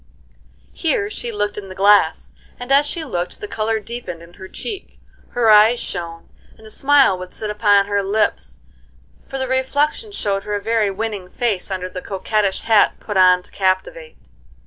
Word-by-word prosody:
Here 405 +5 -1
she 240 - -4
looked 205 -1 -2
in 195 -2 -10
the 185 - -9
glass, 200 -4 +3 0.3
and 245 +2 -6
as 285 +2 +5
she 320 +1 -4
looked 175 -10 -4
the 415 - -6
color 220 - -1
deepened 210 -6 -7
in 170 +1 -16
her 190 - -11
cheek, 405 - -7 0.4
her 235 -2 +3
eyes 215 +3 +6
shone, 170 -2 -5 0.3
and 220 - -17
a 215 - -9
smile 275 -7 +4
would 185 0 -9
sit 215 -1 -3
upon 205 -1 +3
her 205 0 0
lips, 195 - -1 0.7
for 270 - -4
the 260 0 -2
reflection 285 - 0
showed 200 - -2
her 210 +1 -4
a - - -1
very 220 0 +1
winning 200 -2 -4
face 210 -4 -1
under 185 -1 -3
the 185 0 -7
coquettish 200 +1 -1
hat 220 -2 +3
put 205 - -6
on 180 -1 +5
to - - -17
captivate. 335 - -2
210 Hz, 180 wpm, -19 LUFS, 190-245 Hz, 0.7 s, eyes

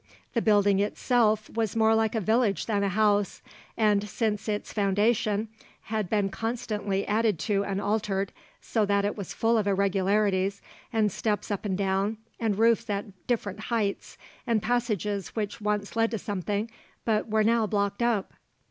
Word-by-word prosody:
The 235 - +1
building 205 -2 +4
itself 215 +1 +2
was 225 -2 -1
more 220 0 +4
like 220 0 +1
a - - +2
village 220 0 +1
than 205 -3 0
a 200 - +1
house, 205 0 +1 0.3
and, 210 -2 +2
since 215 +1 -1
its 205 0 -3
foundation, 210 +1 +1 0.4
had 215 -4 -2
been 205 -2 +1
constantly 210 -2 -2
added 215 -2 +2
to 200 -2 +1
and 195 -1 -2
altered, 200 -2 -1 0.3
so 220 - 0
that 200 0 +2
it 205 - -1
was 200 -3 -6
full 225 +1 +2
of 205 - -1
irregularities 195 0 +1 0.3
and 220 -3 +2
steps 210 +1 -2
up 205 +1 -3
and 190 -3 -1
down 195 +2 0 0.2
and 220 -4 0
roofs 230 +1 +3
at 200 -1 -5
different 215 -5 -1
heights, 215 -2 -2 0.3
and 225 -3 +1
passages 210 -5 -1
which 215 -1 -3
once 210 0 -1
led 225 0 +3
to 225 - -2
something 205 +2 -3 0.3
but 220 0 +1
were 215 0 +3
now 225 0 +3
blocked 200 0 -1
up. 235 -5 0
210 Hz, 165 wpm, -27 LUFS, 200-225 Hz, 0.4 s, building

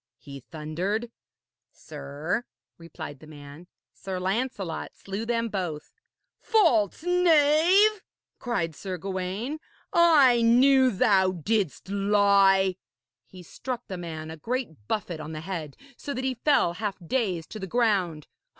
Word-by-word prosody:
he 140 -2 -10
thundered. 175 - -4 0.6
'Sir,' 155 - -5 0.4
replied 160 -4 -9
the 155 - -14
man, 145 +2 -12 0.3
'Sir 190 -1 -5
Lancelot 195 -2 -3
slew 200 +4 -6
them 230 -1 0
both.' 180 -8 -5 0.5
'False 310 - +2
knave!' 355 +4 +4 0.4
cried 180 - -2
Sir 185 +1 -5
Gawaine, 195 - -4 0.3
'I 290 -8 +6
knew 260 +3 +5
thou 190 -3 +3
didst 190 0 -2
lie.' 195 -2 +3 0.5
He 185 -1 -13
struck 250 +8 -6
the 190 - -5
man 160 -2 -6
a 160 - -8
great 160 - -4
buffet 180 -6 -3
on 155 +1 -7
the 155 - -6
head, 160 -5 -6 0.2
so 285 - -6
that 255 - -3
he 260 0 0
fell 250 - +2
half 205 +1 -4
dazed 185 -7 -2
to 215 - -7
the 190 - -5
ground. 190 -10 0
195 Hz, 130 wpm, -26 LUFS, 170-245 Hz, 0.6 s, I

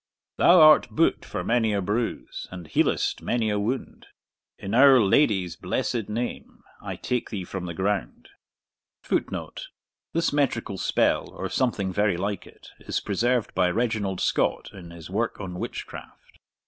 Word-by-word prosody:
Thou 180 +1 +6
art 155 -1 +7
boot 165 - +1
for - - -5
many 115 -2 +1
a 100 - +1
bruise, 105 +5 -3
And 90 -2 -9
healest 80 - 0
many 115 -3 0
a 105 - 0
wound; 120 +6 -4 0.5
In 100 - -6
our 135 +1 +7
Lady's 95 - +2
blessed 110 +4 -2
name, 120 +3 -5 0.2
I - - -5
take 125 -1 -3
thee 100 -4 -4
from 90 0 -6
the 85 - -6
ground. 95 -8 -2 0.7
[Footnote: - - -3 0.5
This 165 -2 0
metrical 120 -8 -1
spell, - - +1
or - - -6
something 100 -7 -1
very 100 -3 +1
like 100 +1 -3
it, - - -16
is - - -3
preserved 120 +3 0
by 90 -1 +2
Reginald 105 -2 -1
Scott - - 0
in 90 -4 -11
his 85 0 -11
work 115 +4 -1
on 90 -3 -6
Witchcraft. - - -8
105 Hz, 150 wpm, -25 LUFS, 95-120 Hz, 0.7 s, art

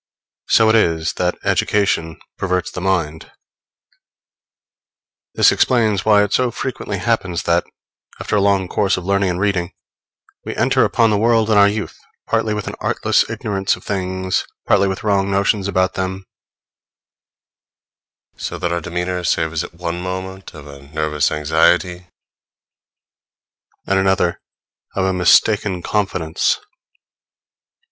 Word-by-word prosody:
So 110 - +5
it 110 - +4
is 80 -7 +1
that - - 0
education 90 -6 0 0.2
perverts 90 -1 -2
the 90 - -6
mind. 85 -5 -2 2.0
This - - +5
explains 110 -6 +2
why 105 -1 +5
it 105 - -2
so 125 -1 +2
frequently 120 -4 -4
happens 95 -4 -1
that, 85 0 +1 0.5
after - - -2
a 100 - +3
long 100 -2 +2
course 100 +1 0
of 90 - -6
learning 100 0 +1
and 90 0 -2
reading, 95 -3 -1 0.7
we - - -6
enter - - +2
upon 115 -2 +2
the 105 - +1
world 115 0 +2
in 105 - +4
our 100 - +7
youth, 105 +1 -4 0.3
partly 110 -1 0
with 105 -2 -4
an - - -5
artless - - +1
ignorance 100 -1 -1
of - - -16
things, 95 -1 -2 0.2
partly 100 - +3
with 95 0 -4
wrong 100 -2 +1
notions 100 0 +1
about 95 -1 +1
them; 95 0 -4 2.1
so - - -5
that 85 - -2
our 85 0 -1
demeanor 90 +2 -3
savors 80 -2 0
at - - -10
one 85 0 -4
moment 95 +1 -6
of 75 -2 -11
a 70 -1 -12
nervous 75 0 -1
anxiety, 85 +4 +1 1.8
at 95 0 +1
another 95 -2 +1 0.5
of 95 - 0
a 95 - +1
mistaken 95 +1 +3
confidence. 95 - 0
95 Hz, 135 wpm, -19 LUFS, 85-100 Hz, 2.1 s, our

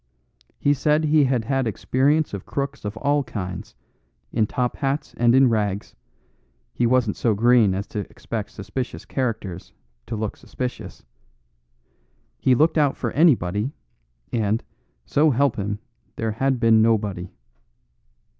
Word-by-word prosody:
He 145 - +3
said 150 +2 +2
he 155 -1 +4
had 125 -4 0
had 135 0 0
experience 140 +7 +1
of 100 - -5
crooks 140 -3 -4
of 105 +1 -4
all 145 +3 +1
kinds, 90 - -6 0.6
in 110 -2 +2
top 125 +2 -1
hats 140 +1 -2
and 120 +1 +4
in 135 0 +6
rags; 105 -4 -1 0.8
he 120 - +1
wasn't 125 -4 +2
so 115 -3 +1
green 115 -3 +4
as 100 +1 -3
to 105 - -4
expect 110 -3 -5
suspicious 110 +6 -5
characters 105 -9 -3 0.3
to 115 - -3
look 110 -1 -3
suspicious; 125 -1 -6 1.4
he 130 - +4
looked 155 +4 +3
out 145 -2 +2
for - - -2
anybody, 125 - +2 0.6
and, 110 -1 0 0.4
so 155 +2 +3
help 140 -1 +2
him, 100 0 -2 0.4
there 110 -1 -2
had 130 +3 0
been 115 -1 +5
nobody. 105 -5 +1
120 Hz, 135 wpm, -23 LUFS, 105-135 Hz, 1.4 s, in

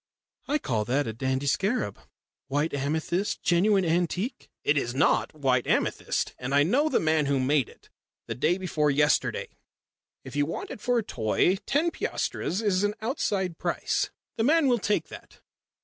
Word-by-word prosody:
I 295 - +2
call 115 - -1
that 135 +5 +1
a 110 - -4
dandy 130 +3 -1
scarab. 190 - 0 0.5
White 145 +4 0
amethyst. 160 +7 -1
Genuine 190 +2 +3
antique." 180 +9 -1
"It 145 - +3
is 125 -3 -1
not 135 - +2
white 130 -4 +1
amethyst - - 0
and 135 +2 -2
I 145 - +6
know 275 - +2
the - - +2
man 155 -2 +2
who 140 -1 +1
made 135 -1 +2
it - - -20 0.3
the - - -4
day 170 +8 +1
before 155 -5 0
yesterday. 145 -1 +1 0.7
If - - -9
you 145 0 +1
want 165 - -5
it - - -8
for 245 -1 +1
a 230 - +1
toy, 125 - +1
ten 320 +5 +2
piastres 195 - -2
is 195 -2 +2
an 205 0 0
outside 200 - -2
price. - - -1 0.3
The 225 - +1
man 310 +3 +4
will 245 -2 +3
take 210 +1 0
that." - - -12
165 Hz, 170 wpm, -27 LUFS, 140-210 Hz, 0.7 s, I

